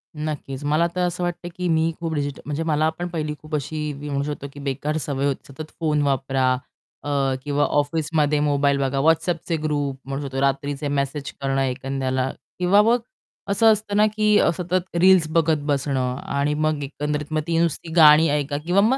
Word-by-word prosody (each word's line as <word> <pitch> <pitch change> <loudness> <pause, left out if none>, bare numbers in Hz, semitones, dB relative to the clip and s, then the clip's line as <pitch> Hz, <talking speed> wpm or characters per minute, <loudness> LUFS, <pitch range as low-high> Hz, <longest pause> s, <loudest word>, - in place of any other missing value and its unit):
नक्कीच, 150 -2 -5
मला 155 +4 +2
तर 180 - 0
असं 175 +1 -3
वाटतं 175 0 -3
की 180 -1 -2
मी 160 0 +2
खूप 165 -1 -3
डिजिटल 145 -2 -3
म्हणजे 150 +2 -2
मला 155 0 +2
पण 175 - -2
पहिली 155 -3 -3
खूप 155 0 -5
अशी 150 +1 -3
मी 145 +1 -7
म्हणू 140 0 -1
शकतो 145 -1 -5
की 145 - -10
बेकार 140 +3 -2
सवय 140 -1 -2
होती. 140 0 -3
सतत 155 +2 -8
फोन 150 -2 +1
वापरा 135 -2 +1 0.5
अ, 145 - -4 0.3
किंवा 145 0 0
ऑफिसमध्ये 150 0 +1
मोबाईल 145 -1 +2
बघा 135 0 0
WhatsAppचे 165 +2 +1
ग्रुप 145 -3 -1
म्हणू 135 +1 -4
शकतो. 135 -1 -4
रात्रीचे 140 +1 -1
मेसेज 140 0 -2
करणं 135 0 0
एखाद्याला 130 0 -1 0.3
किंवा 185 +3 +5
मग 230 +3 +3 0.5
असं 220 +3 +5
असतं 210 -1 -1
ना, 210 - +6
की 215 0 +2
अ, - - +4
सतत 180 0 -2
रील्स 185 -3 +6
बघत 160 -1 +3
बसणं 135 -3 0
आणि 140 +1 0
मग 155 -1 0
एकंदरीत 150 +2 -4
मग 155 - +1
ती 165 -1 +1
नुसती 165 0 -1
गाणी 155 0 +8
ऐका 145 0 -1
किंवा 180 +4 +3
मग 245 +6 +3
150 Hz, 185 wpm, -23 LUFS, 140-165 Hz, 0.5 s, गाणी